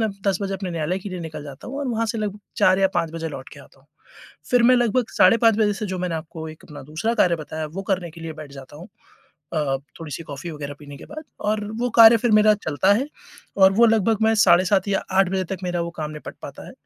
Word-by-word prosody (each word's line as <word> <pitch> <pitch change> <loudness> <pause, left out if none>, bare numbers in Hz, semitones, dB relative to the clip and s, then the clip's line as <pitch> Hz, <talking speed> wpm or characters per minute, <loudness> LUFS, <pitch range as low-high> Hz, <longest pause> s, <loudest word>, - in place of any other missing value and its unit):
मैं 220 - +1 0.2
10 195 -2 +2
बजे 195 0 -2
अपने 190 -1 -5
न्यायालय 170 +2 -2
के 195 - -8
लिए 185 -2 -6
निकल 155 -3 -7
जाता 140 - -10
हूँ 275 +2 -5
और 285 - -3
वहाँ 230 -1 -1
से 220 +1 -3
लगभग 210 -1 -3 0.2
4 185 +1 +4
या 195 - +3
5 165 - 0
बजे 165 -1 -4
लौटकर - - -10
आता - - -21
हूँ। - - -29 0.6
फिर 245 -1 +4
मैं 250 +1 +6
लगभग 240 0 +1
साढ़े 185 +5 +6
5 225 -2 +4
बजे 210 -2 +3
से 210 +2 -4
जो 185 - -4
मैंने 180 -2 -2
आपको 160 0 -6
एक 155 - -12
अपना 150 - -11
दूसरा 155 - -2
कार्य 180 -7 +3
बताया 155 0 -5
वो 180 +6 -6
करने 175 -3 -2
के 165 - -13
लिए 165 - -5
बैठ 140 - -13
जाता 135 +1 -12
हूँ 175 +6 -11 0.7
अ, 145 -3 0 0.2
थोड़ी-सी 160 0 -6
कॉफी 145 +4 -7
वगैरह 145 -2 -7
पीने 145 -1 -11
के - - -11
बाद 310 +1 -9 0.2
और 210 0 -1 0.2
वो 245 - +1
कार्य 230 0 +9
फिर 240 +1 0
मेरा 215 0 +6
चलता 155 +6 +3
है 260 +7 0 0.5
और 190 0 +6
वो 235 +4 +5
लगभग 225 -1 +2
मैं 220 0 +4
साढ़े 180 -3 +5
7 190 +1 +1
या 195 - 0
8 190 -1 +4
बजे 190 -1 -1
तक 190 - -4
मेरा 175 -1 -1
वो 170 - -4
काम 155 -1 -3
निपट 150 0 -9
पाता - - -9
है। - - -11
185 Hz, 260 wpm, -22 LUFS, 160-215 Hz, 0.7 s, कार्य